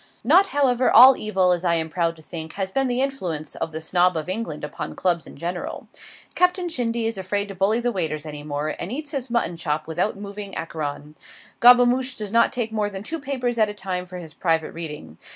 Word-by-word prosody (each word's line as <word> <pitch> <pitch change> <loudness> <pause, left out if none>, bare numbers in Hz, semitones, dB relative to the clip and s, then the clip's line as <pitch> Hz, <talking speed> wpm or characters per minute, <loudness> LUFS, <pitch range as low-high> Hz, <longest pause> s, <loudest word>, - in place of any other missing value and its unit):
Not, 390 - +5
however, 260 -3 +2
all 255 +3 +9
evil, 190 -4 +1
as 175 0 0
I 170 -2 +2
am 160 -1 0
proud 165 +1 -1
to 160 - -16
think, 160 0 -7
has 190 -1 -3
been 270 +3 +1
the 250 +1 +1
influence 175 - -3
of - - -4
the 160 - -4
Snob 175 +2 +2
of 155 - -4
England 185 -6 -4
upon 150 - -6
Clubs 175 -3 0
in - - -12
general: 175 +1 -5 0.4
Captain 360 0 +2
Shindy 235 -6 -1
is 225 -3 -2
afraid 200 +2 -1
to - - -6
bully 195 +5 +1
the 240 0 0
waiters 160 -6 -2
any 150 -1 -7
more, 145 +1 -3
and 175 - -4
eats 295 +3 -5
his 270 -4 -4
mutton 235 -8 0
chop 155 -1 -2
without 175 +6 -1
moving 200 0 -7
Acheron. 150 -2 -5 0.4
Gobemouche 245 +1 +5
does 210 -2 -5
not 230 +1 +4
take 235 -4 -2
more 210 -2 -1
than 195 -1 -7
two 325 +9 -4
papers 255 -4 -2
at 215 -1 +4
a 210 - -7
time 185 -2 -4
for 180 0 -8
his 165 -3 -9
private 165 -3 0
reading. 150 - -7
190 Hz, 220 wpm, -23 LUFS, 165-240 Hz, 0.4 s, all